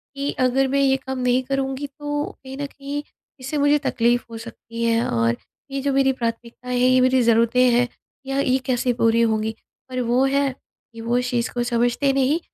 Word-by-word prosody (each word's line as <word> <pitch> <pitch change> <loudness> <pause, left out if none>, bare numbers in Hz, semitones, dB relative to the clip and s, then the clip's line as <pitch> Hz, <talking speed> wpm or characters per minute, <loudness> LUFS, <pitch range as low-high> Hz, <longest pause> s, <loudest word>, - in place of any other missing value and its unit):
कि 280 +1 -2
अगर 265 +2 +2
मैं 275 +1 +1
ये 270 -1 +4
काम 265 0 -6
नहीं 250 +1 +2
करूँगी 270 +1 -2
तो 290 0 -2 0.2
कहीं 265 0 -8
न 285 - -3
कहीं 280 +1 -5 0.4
इससे 270 +4 -4
मुझे 290 +1 +4
तकलीफ़ 240 +1 +1
हो 225 - -6
सकती 230 0 -7
है 230 0 +2
और 115 0 +1 0.4
ये 275 0 -2
जो 280 0 0
मेरी 270 0 +3
प्राथमिकताएँ 240 +1 -4
है, 250 - +4
ये 255 0 +5
मेरी 255 0 +4
ज़रूरतें 235 +1 +3
हैं 245 +1 +3 0.4
या 270 +1 -1
ये 260 -1 +2
कैसे 250 -1 +1
पूरी 230 -1 +2
होंगी। 220 -1 +1 0.4
पर 255 0 -2
वो 250 +2 +3
है 275 +1 +2 0.4
कि 230 - -9
वो 235 +2 0
इस 250 0 -1
चीज़ 240 -1 -1
को 240 - -1
समझते 240 +3 +1
नहीं 275 +4 +2
255 Hz, 200 wpm, -22 LUFS, 235-270 Hz, 0.4 s, ये